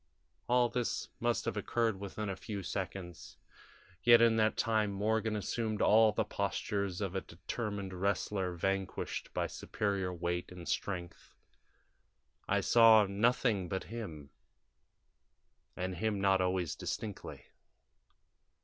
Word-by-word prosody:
"All 125 0 +4
this 120 0 -2
must - - 0
have - - -2
occurred 115 -4 0
within 100 +2 -5
a 95 - -2
few 100 +1 -6
seconds, 90 -1 -6 0.6
yet 120 +5 +7
in 115 -1 +5
that 110 0 +2
time 110 -2 +1
Morgan 110 +2 0
assumed 110 +1 -2
all 110 0 +6
the - - 0
postures 100 -2 -2
of 95 -3 -2
a 95 - -1
determined 100 +2 -5
wrestler 95 -1 -1
vanquished 95 +2 -2
by - - -1
superior 100 -3 -2
weight 85 0 -3
and 90 -2 -9
strength. 90 -3 -4 1.1
I - - +2
saw 115 -2 +7
nothing 105 -1 +1
but 95 +1 -2
him, 80 -12 -7 1.5
and 95 +1 -2
him 105 +1 0
not 95 -1 +3
always 90 -4 0
distinctly. 105 -3 -5
100 Hz, 120 wpm, -33 LUFS, 95-110 Hz, 1.5 s, yet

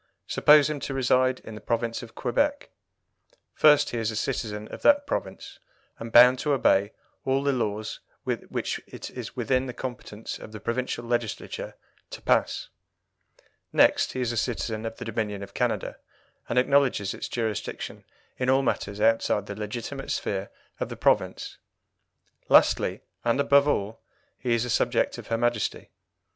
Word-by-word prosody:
Suppose 150 -1 +6
him 150 -1 -3
to 135 - -4
reside 130 0 +2
in 110 - -10
the 105 - -9
province 115 +1 -1
of 115 -3 -12
Quebec. 285 0 0 0.8
First, 150 -1 +5
he 120 - -2
is 110 -1 0
a 110 - -4
citizen 105 -3 -3
of - - -9
that 285 0 +5
province, - - -5 0.4
and 115 0 -7
bound 125 +2 +8
to 150 -1 +1
obey 105 -6 +3 0.3
all 135 +1 +1
the 140 -1 +2
laws 110 -3 -2 0.2
which - - -3
it - - -8
is - - -7
within 130 0 0
the 125 - -6
competence 115 -4 -6
of 110 - -11
the 110 - -7
provincial 120 +2 -3
Legislature 120 -2 -3 0.3
to - - -8
pass. - - +1 1.0
Next, - - +4
he 130 - -2
is 120 -2 0
a 120 - -3
citizen 115 -1 -2
of 115 - -7
the 125 - -7
Dominion 105 -3 -3
of 100 - -11
Canada, - - -1 0.5
and 120 - -1
acknowledges 130 -6 +3
its - - -5
jurisdiction 110 -4 -4 0.4
in 125 0 0
all 135 +1 +4
matters 100 -5 -2
outside 110 -2 +2
the 100 - -6
legitimate 120 +6 -5
sphere 100 0 -2 0.3
of - - -2
the - - -7
province. - - 0 0.9
Lastly, - - +4 0.2
and 120 +3 +1
above 140 0 +5
all, 110 -6 -1 0.4
he 120 -2 +1
is 115 +1 0
a - - -5
subject - - +1
of - - -10
her 115 - 0
Majesty. 120 -2 -1
120 Hz, 160 wpm, -26 LUFS, 110-130 Hz, 1.0 s, bound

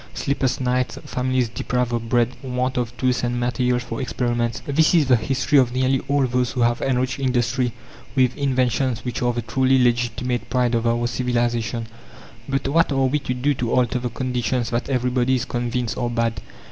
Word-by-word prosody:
Sleepless 135 -3 -1
nights, 125 -2 0
families 130 -1 0
deprived 120 +1 -2
of 115 -1 -2
bread, 120 -1 +3
want 130 0 -2
of 120 -1 -2
tools 125 -1 +1
and 120 0 -1
materials 125 0 0
for 120 +1 -5
experiments, 120 -2 -1
this 155 +4 +3
is 160 -4 +4
the 130 -1 +5
history 135 +4 +2
of 125 -1 +1
nearly 130 +1 +2
all 140 -1 +2
those 125 -1 0
who 125 - -1
have 120 0 +2
enriched 130 0 0
industry 125 -1 0 0.4
with 130 -2 +3
inventions 130 -3 0
which 125 - -3
are 120 0 +2
the 120 -1 -3
truly 130 +3 +2
legitimate 120 0 0
pride 125 -2 +1
of 115 0 +1
our 120 +1 +1
civilization. 120 -2 -1 0.6
But 135 0 -1
what 165 +3 +3
are 135 -1 +2
we 140 +3 +1
to 125 -2 -3
do 140 +4 +1
to 120 -3 -2
alter 125 0 +2
the 125 0 -3
conditions 125 -1 -2
that 120 +4 -2
everybody 125 0 +1
is 125 -1 -1
convinced 120 0 -2
are 120 - 0
bad? 115 -3 -1
125 Hz, 185 wpm, -22 LUFS, 120-130 Hz, 0.6 s, the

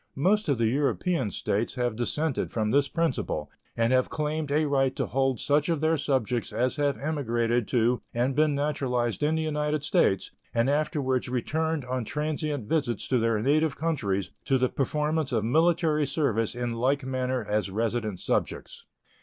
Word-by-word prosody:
Most 195 +5 +2
of 140 - +2
the 115 - +1
European 140 - +1
States 105 +4 -2
have 120 -3 -1
dissented 135 +5 -1
from 110 -2 0
this 140 +2 +3
principle, 130 - -2 0.3
and 115 +2 +2
have 130 0 +3
claimed 150 -1 -2
a 155 +2 +2
right 135 -2 +1
to - - -1
hold 135 -1 0
such 150 +2 +1
of 165 -3 +1
their 160 +2 +2
subjects 130 -5 -1
as 125 +1 0
have 145 -2 +1
emigrated 120 -6 0
to 120 0 +2
and 125 +3 0
been 150 -1 +3
naturalized 130 -5 -1
in 150 +2 +2
the 160 - 0
United 150 -1 -1
States 150 - +2 0.2
and 115 +4 +3
afterwards 140 -4 0
returned 155 +4 -1
on 125 -1 -2
transient 150 -2 -3
visits 135 -8 -1
to 130 - +3
their 115 -2 +1
native 150 +2 +2
countries 100 - -1
to 135 - +3
the 130 0 +1
performance 150 +1 -1
of 110 -3 0
military 160 +2 +2
service 125 -7 0
in 120 -1 -2
like 130 +4 +1
manner 130 -2 -1
as 105 -1 0
resident 110 -1 -2
subjects. - - -3
135 Hz, 170 wpm, -27 LUFS, 120-150 Hz, 0.3 s, this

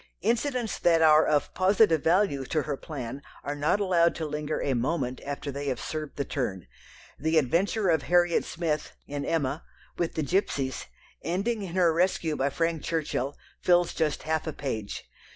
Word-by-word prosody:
Incidents 240 +1 0
that 165 -2 +4
are 155 0 +7
of 150 -1 +1
positive 185 -4 +4
value 170 -5 +2
to 155 +3 -1
her 145 - -2
plan 135 -3 -6 0.2
are 145 - -2
not 145 +7 +1
allowed 175 -4 +3
to 160 - -3
linger 150 0 -3
a 140 - 0
moment 130 +1 -1
after 145 0 -4
they 140 +1 -5
have 130 -3 -1
served 155 -2 -5
the 140 - -1
turn. 100 - -3 0.5
The 160 +3 +1
adventure 180 - +2
of 160 -3 +3
Harriet 175 0 +3
Smith 155 -3 -2
(in 145 0 -4
Emma) 150 -1 -1 0.4
with 170 -2 -1
the 155 - 0
gipsies, 140 -5 -1 0.4
ending 200 +8 -1
in 185 -3 -6
her 175 -3 +4
rescue 170 -2 +1
by 140 0 +1
Frank 165 +1 -1
Churchill, 145 -4 -2 0.2
fills 175 -1 +3
just 155 -3 -1
half 160 +1 -1
a 155 - -2
page. 110 -8 -4
160 Hz, 170 wpm, -27 LUFS, 140-175 Hz, 0.5 s, are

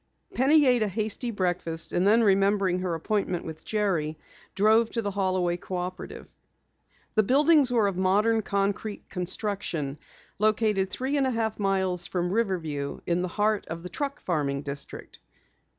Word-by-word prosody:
Penny 290 +4 +4
ate 250 -3 +4
a 215 - +2
hasty 215 +4 -2
breakfast, 175 -5 -2
and 180 +3 +2
then 225 +3 +5
remembering 195 -2 +3
her 180 -2 -2
appointment 180 +1 -2
with 160 -1 -7
Jerry, 180 -8 -1 0.4
drove 220 +3 +4
to 230 - -3
the 205 - -2
Holloway 185 -3 0
Cooperative. 180 0 -6 0.9
The 215 - +4
buildings 285 +5 +4
were 235 -4 +2
of 195 -3 -1
modern 210 +4 +2
concrete 200 +1 -2
construction, 180 -6 -2 0.4
located 215 -2 +2
three 265 +7 -2
and 270 -2 +2
a - - +1
half 225 -3 -2
miles 190 -3 0
from 175 -1 -2
Riverview 170 -10 -2
in 175 +1 0
the 180 - -1
heart 210 +3 0
of 165 +1 -6
the 180 - -6
truck 280 +8 -4
farming 145 -5 -1
district. 140 0 -6
195 Hz, 150 wpm, -27 LUFS, 180-220 Hz, 0.9 s, then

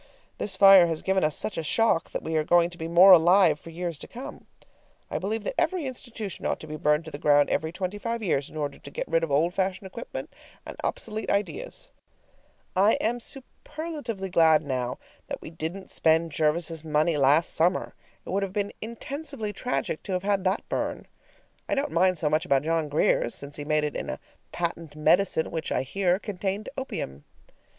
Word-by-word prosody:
This 195 - -2
fire 195 -2 +8
has 165 -2 -3
given 190 -1 +1
us 155 0 +2
such 215 - -2
a - - -3
shock 195 +1 +2
that - - -5
we 160 - -3
are 155 - +2
going 175 +2 +3
to 175 - -11
be 160 - -3
more 175 +3 +8
alive 175 -2 +6
for 165 - -12
years 170 -2 -5
to - - -9
come. 250 +3 -9 0.6
I - - -1
believe 215 +3 -2
that - - -2
every 365 -5 0
institution 240 -6 -6
ought - - -1
to - - -8
be 155 - -6
burned 150 +1 +1
to 160 - -8
the 145 - -7
ground 145 -1 +4
every 160 0 0
twenty 185 +3 -4
five 230 +1 -3
years 145 -8 0
in - - -10
order 145 -2 -3
to - - -11
get - - -4
rid 165 0 +1
of 165 - -1
old 155 +5 +2
fashioned 190 0 -1
equipment 210 +5 -7 0.3
and - - -7
obsolete 220 0 -3
ideas. - - -2 0.8
I 200 +4 +5
am 240 +2 0
superlatively 265 - -6
glad 160 -2 +5
now 125 -3 -2 0.3
that - - -5
we - - -10
didn't 165 +4 -6
spend 160 0 +2
Jervis's 160 +1 0
money 155 +1 +1
last 145 +3 +3
summer; 175 +3 +1 0.3
it - - -6
would 195 +2 0
have 195 -1 -3
been 205 0 -1
intensively 235 0 -5
tragic 250 -10 -2
to 195 - -5
have 180 0 -1
had 200 -1 +1
that 190 +3 0
burn. - - -3 0.6
I - - +2
don't 280 +1 -1
mind 185 +2 +3
so 155 - 0
much 155 +1 +2
about 135 0 +2
John 160 -1 0
Grier's, 145 -4 +2
since 140 +1 -6
he 145 - -5
made 155 0 +2
it 150 - -2
in - - -4
a - - -4 0.3
patent 165 -3 -4
medicine 160 +2 +2
which, 160 -2 -3
I - - +1
hear, 180 +6 +1
contained 200 0 -4
opium. 70 - -5
175 Hz, 200 wpm, -26 LUFS, 155-200 Hz, 0.8 s, fire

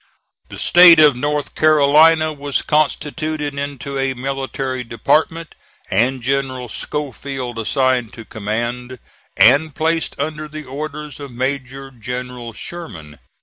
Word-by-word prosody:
The - - -9
State 175 -2 +7
of 150 -4 +6
North 145 +3 -2
Carolina 155 +1 +4
was 145 -1 -2
constituted 150 0 -1
into 140 -1 -5
a 135 -1 -1
military 135 0 -4
department, 155 +7 0 0.4
and 125 +5 +1
General 130 -2 -2
Schofield 135 -3 -5
assigned 130 0 0
to 115 - -10
command, 120 +5 -4 0.4
and 155 0 +5
placed 165 +1 -1
under 155 +1 -3
the 155 0 -8
orders 150 +1 -7
of 140 -1 -8
Major 135 +1 -4
General 125 0 -6
Sherman. 90 - -9
135 Hz, 115 wpm, -19 LUFS, 125-150 Hz, 0.4 s, State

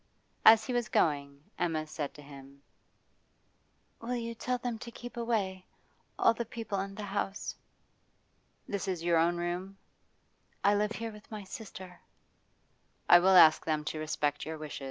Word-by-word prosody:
As 220 0 +8
he 255 - -3
was 240 -2 0
going, 140 -2 0 0.2
Emma 160 -3 0
said 155 -2 -4
to 150 - -12
him: 140 0 -13 1.4
'Will 240 +2 -2
you 230 -1 -3
tell 250 +2 -2
them 240 -2 -4
to 235 - -8
keep 240 +1 -10
away 205 -6 -2 0.5
all - - +5
the 235 - -3
people 225 -3 -4
in 195 0 -4
the 210 - -6
house?' 200 0 -3 1.1
'This 200 0 -3
is 180 -3 -2
your 170 -1 +3
own 170 +1 +2
room?' 180 +3 -4 0.9
'I 200 - +5
live 210 +1 +1
here 225 +2 -5
with 210 -1 -14
my 215 -2 -6
sister.' 190 -3 -9 1.1
'I 175 - +10
will 185 +1 +5
ask 160 -2 +8
them 155 -1 -1
to 155 0 -3
respect 150 -2 -1
your 160 0 -5
wish. 155 -1 -7
190 Hz, 160 wpm, -31 LUFS, 155-220 Hz, 1.4 s, I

